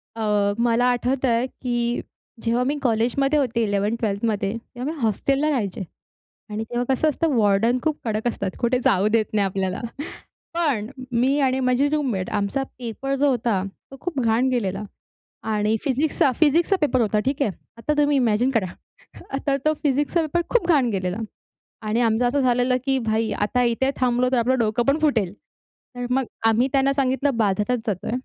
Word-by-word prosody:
अ, 210 -2 +1
मला 235 +1 +2
आठवतंय, 245 -1 +1
की 240 -2 -2 0.4
जेव्हा 235 +2 +1
मी 285 +3 -1
कॉलेजमध्ये 255 +5 +1
होते, 235 -4 0
11th-12thमध्ये 205 0 -1 0.2
तेव्हा 240 +7 -4
हॉस्टेलला 275 +7 +1
राहायचे. 210 -9 -2 0.7
आणि 210 +1 -3
तेव्हा 240 0 -1
कसं 285 +4 +2
असतं, 315 +2 0
वॉर्डन 220 +3 +3
खूप 310 -1 0
कडक 220 0 -2
असतात, 200 -4 -3
कुठे 245 +1 +1
जाऊ 195 +2 +3
देत 225 -1 +3
नाही 205 -1 +3
आपल्याला. 190 -1 -2 0.7
पण 290 -11 0 0.3
मी 260 +5 +2
आणि 265 -1 +2
माझी 255 +2 +2
रूममेट, 255 -12 -1
आमचा 205 +6 -1 0.2
पेपर 255 +3 -3
जो 285 +1 +2
होता, 230 -6 0 0.3
तो 270 - -10
खूप 335 -7 -3
घाण 235 +2 +2
गेलेला.आणि 210 0 -3
फिजिक्सचा 280 0 +2
फिजिक्सचा 330 +5 +4
पेपर 285 -4 +2
होता, 215 -2 +1
ठीक 275 +2 0
आहे. 220 - +1 0.3
आता 230 +6 -1
तुम्ही 290 -1 +3
इमॅजिन 245 0 +2
करा, 225 -7 +1 0.7
आता 275 0 0
तो 310 - +5
फिजिक्सचा 290 +4 +1
पेपर 315 +2 0
खूप 475 -8 +2
घाण 285 -7 +4
गेलेला. 185 -2 -2 0.7
आणि 215 +2 0
आमचं 230 +1 +2
असं 280 +3 +1
झालेलं, 250 0 +2
की 270 -1 +1
"भाई 225 -2 0
आता 210 +5 0
इथे 240 +3 +1
थांबलो 250 0 +2
तर, 255 - +3
आपलं 255 +3 +2
डोकं 230 +1 +1
पण 275 +2 +3
फुटेल." 230 - +1 0.6
तर 245 0 -3
मग 265 +1 +2 0.2
आम्ही 225 +4 +3
त्यांना 275 0 +3
सांगितलं 270 0 0
बाजारात 210 +3 +1
जातोय. 200 -5 -2
245 Hz, 160 wpm, -23 LUFS, 220-270 Hz, 0.7 s, तो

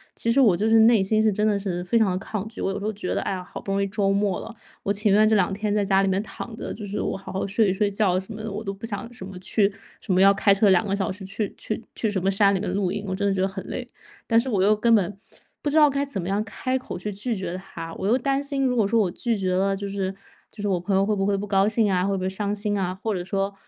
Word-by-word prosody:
其 230 - -2
实 270 +4 +4
我 195 -8 +5
就 215 - 0
是 225 0 +5
内 225 -2 +6
心 215 +3 +2
是 215 - +4
真 210 +2 +1
的 205 -1 +2
是 185 -3 -3
非 230 +6 +2
常 215 -4 +3
得 180 - -1
抗 215 0 -4
拒， 225 - -11
我 - - 0
有 195 - -3
时 200 - -6
候 215 - 0
觉 200 -3 -4
得， - - 0
哎 - - -2
呀， 185 - -3
好 180 - -9
不 195 - -5
容 200 0 +1
易 200 - 0
周 195 -1 0
末 200 -2 0
了， 230 - -8 0.3
我 200 - 0
情 205 0 +2
愿 215 +2 +6
这 215 -1 +4
两 195 0 +1
天 205 +1 -1
在 210 -1 +1
家 195 0 +3
里 195 - +1
面 190 +1 +1
躺 225 +1 -8
着， - - -5
就 210 - -7
是 205 +1 -4
我 - - -1
好 195 - -8
好 190 - -2
睡 210 +1 +2
一 185 - +1
睡 205 +1 +1
觉 195 -3 +1
什 190 +4 -8
么 215 - -7
的， 220 - -4
我 210 +2 -4
都 200 -2 -4
不 200 +4 -8
想 225 +1 -4
什 190 - -8
么 190 -1 -9
去 200 +2 +1 0.3
什 190 - -1
么 180 - +3
要 195 +1 +7
开 200 0 +4
车 200 +1 +4
2 190 +2 +4
个 195 - -1
小 200 -1 -1
时 190 +1 -6
去 200 +2 -3
去 215 +1 -4
去 220 -3 -1
什 190 -3 -1
么 190 - +1
山 200 0 +4
里 190 - 0
面 200 - -3
露 190 -2 0
营， 205 +1 -4
我 190 - -2
真 200 - -1
的 200 - +2
觉 190 - -2
得 190 - +2
很 195 0 -6
累。 245 -1 -5 0.4
但 230 - +3
是 255 +3 +2
我 200 -5 +1
又 210 +2 +4
根 230 +2 +3
本 200 -2 +2 0.4
不 295 - -1
知 305 - +1
道 300 -2 +7
该 280 +1 -1
怎 210 -10 -4
么 175 - -5
样 200 +2 0
开 255 +5 -2
口 255 - -7
去 210 +4 -4
拒 225 +4 -3
绝 185 -2 -4
他， 165 -3 -8
我 195 - -3
又 240 +4 +4
担 275 +1 0
心， 280 -1 -1
如 250 - +1
果 225 -4 +3
说 230 +1 +2
我 185 -5 +1
拒 230 +2 -1
绝 185 -2 0
了， 195 +1 +1
就 200 +1 -5
是 195 -1 -2 0.4
就 210 - -9
是 205 - -1
我 185 -3 +1
朋 190 +2 -1
友 195 +1 +3
会 210 0 +1
不 195 - 0
会 200 0 +2
不 205 - -3
高 195 0 +3
兴 220 -1 +2
啊， 180 0 +1
会 200 0 0
不 - - -4
会 185 - 0
伤 200 +1 -2
心 205 0 -1
啊， 185 -1 -1
或 215 +3 -3
者 180 -2 -3
说 195 +1 -2
200 Hz, 355 characters per minute, -24 LUFS, 195-220 Hz, 0.4 s, 要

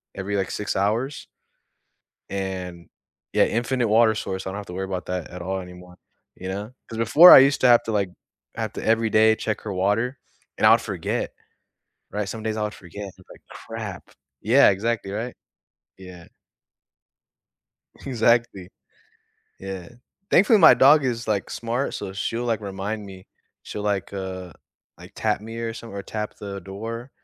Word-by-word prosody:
every, 100 +1 -3
like, 95 - -2
6 105 - -3
hours 110 +8 -1 1.0
and 95 -3 -5 0.5
yeah, - - +5
infinite 120 +1 0
water 110 0 +4
source. 95 -3 -4
I - - -2
don't 100 - -5
have 100 - -7
to 90 - -8
worry 95 +1 -3
about 95 -1 -5
that 90 -2 -4
at 90 0 -8
all 95 +2 -3
anymore, 90 0 -12 0.4
you 95 - -8
know? 100 +4 -5 0.2
'Cause 115 - -7
before 150 +10 +8
I - - +12
used 140 +1 +3
to 130 - +5
have 120 -1 +6
to, 115 - -4
like 100 -3 0 0.5
have - - -3
to - - -6
every 115 0 +2
day 110 +1 +5
check 110 -1 -3
her 105 -3 -5
water 105 +8 0 0.4
and - - +2
I'll - - +8
forget, - - -3 0.8
right? 105 -2 -3
Some 110 -1 -6
days 110 0 -2
I 110 - -2
would 105 - -4
forget, 95 +3 -10
and 95 - -8
be 95 - -19
like, - - -17
"Crap." 110 -5 -8 0.3
Yeah, 120 +2 +6
exactly, 100 0 -2
right? 115 +4 -4 0.6
Yeah. 90 -3 -12 1.8
Exactly. 115 -6 +1 0.9
Yeah. 95 -2 -7 0.4
Thankfully, 210 +3 +5
my 160 -7 +9
dog 140 +3 +6
is, 115 -3 -2
like, 100 -2 -1
smart, 120 +4 -2
so 95 -2 -5
she'll, 115 +4 -3
like, 115 -3 -1
remind 100 +2 -5
me. 95 -1 -12 0.4
She'll, 105 - -6
like, 100 -2 -2
uh, 95 -3 -6 0.5
like, - - -13
tap 105 -2 0
me 115 +2 -8
or 115 -1 -3
some 115 0 -9
or 100 - -5
tap 105 +1 -5
the 100 -1 -6
door. 115 +7 -7
105 Hz, 170 wpm, -24 LUFS, 95-115 Hz, 1.8 s, I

